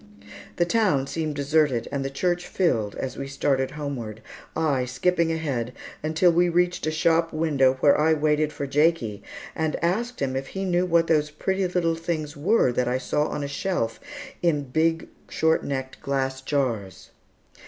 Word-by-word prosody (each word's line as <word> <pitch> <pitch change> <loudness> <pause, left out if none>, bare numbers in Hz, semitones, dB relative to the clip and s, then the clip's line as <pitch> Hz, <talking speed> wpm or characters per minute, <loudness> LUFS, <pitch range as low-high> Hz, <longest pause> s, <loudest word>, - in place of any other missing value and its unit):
The 175 - +2
town 180 -9 +2
seemed 155 +1 -3
deserted, 145 -3 +1
and 140 -1 -2
the 135 - -2
church 175 +5 -1
filled, 115 - 0
as 130 - -5
we 135 - -4
started 135 -1 0
homeward, 120 -7 -5 0.3
I 145 -6 +1
skipping 165 +7 +1
ahead 135 -7 -2 0.3
until 160 +3 +3
we 175 +1 +3
reached 175 -1 +1
a - - +1
shop 165 +1 +2
window 145 -5 +2
where 145 - +6
I 160 +1 +3
waited 150 0 +1
for 140 - -4
Jakie 140 -7 +1 0.3
and 160 -1 -1
asked 230 +8 0
him 130 -1 -1
if 135 +1 -3
he 195 0 -4
knew 180 0 +1
what 170 -1 +3
those 150 -2 +2
pretty 190 +5 -1
little 175 -2 +1
things 165 -2 -3
were 165 - +3
that 125 0 0
I 125 +1 +1
saw 150 +3 0
on 145 - -4
a - - -2
shelf, 140 -5 -2 0.4
in 155 -4 +2
big 160 +5 0 0.2
short 160 0 +2
necked 130 -1 -4
glass 135 -1 -1
jars. 120 - -2
150 Hz, 170 wpm, -25 LUFS, 135-170 Hz, 0.4 s, where